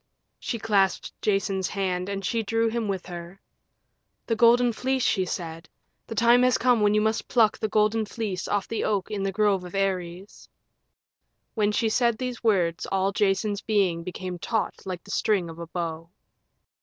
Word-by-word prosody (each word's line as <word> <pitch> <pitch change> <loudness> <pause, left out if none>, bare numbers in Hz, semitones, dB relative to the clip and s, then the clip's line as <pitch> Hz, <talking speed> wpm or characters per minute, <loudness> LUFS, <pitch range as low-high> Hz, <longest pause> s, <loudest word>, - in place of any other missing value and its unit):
She 235 - -3
clasped 200 -4 +1
Jason's 195 -2 0
hand 185 -2 -2
and 195 -1 -4
she 230 +2 0
drew 225 +2 +1
him 225 -1 -2
with 190 -2 -3
her. 175 +1 -9 0.9
"The 225 - 0
Golden 235 +1 +5
Fleece," 260 +2 -1
she 190 - +2
said, 165 -2 -6 0.4
"the 225 - -6
time 235 +3 +5
has 250 -1 +4
come 245 -2 +3
when 210 0 +3
you 210 - +3
must 220 +1 0
pluck 225 -3 +3
the 215 - 0
Golden 215 +1 +2
Fleece 205 -5 -4
off 205 -1 -1
the 225 - -2
oak 200 -1 -1
in 205 -2 -2
the 195 0 -1
grove 200 -2 +1
of 180 +1 -9
Ares." 190 -1 -3 1.0
When 210 -2 +1
she 225 +2 +1
said 235 0 +2
these 250 -1 -5
words 180 -7 +1
all 195 0 +1
Jason's 205 +1 0
being 195 -6 +1
became 180 0 -6
taut 220 +4 -1
like 180 -2 -5
the 200 - -10
string 190 -7 +1
of 165 - -12
a 170 - -6
bow. 165 -1 -4
200 Hz, 180 wpm, -26 LUFS, 185-225 Hz, 1.0 s, Golden